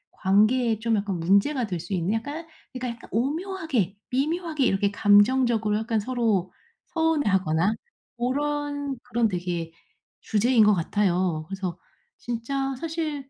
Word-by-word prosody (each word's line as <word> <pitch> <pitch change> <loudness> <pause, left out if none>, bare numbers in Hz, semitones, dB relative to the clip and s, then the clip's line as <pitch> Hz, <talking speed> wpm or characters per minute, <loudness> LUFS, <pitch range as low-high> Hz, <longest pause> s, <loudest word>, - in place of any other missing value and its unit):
관계에 215 +4 +3
좀 230 0 +1
약간 200 -3 -2
문제가 200 - +2
될 180 -4 -3
수 175 +4 -6
있는 180 +3 0
약간 290 +9 -4 0.2
그러니까 255 -1 -4
약간 230 - -15
오묘하게 280 - -1
미묘하게 305 +2 0
이렇게 200 -1 +2
감정적으로 215 +1 +4
약간 220 0 -1
서로 215 -6 0 0.4
서운해하거나 205 - +1 0.4
고런 285 +2 -2
그런 240 -2 +1
되게 175 -3 -3 0.5
주제인 225 +2 +3
것 210 0 +5
같아요. 180 -3 0
그래서 190 -2 -4 0.4
진짜 270 +4 -3
사실 310 -4 -4
225 Hz, 300 characters per minute, -25 LUFS, 195-275 Hz, 0.5 s, 것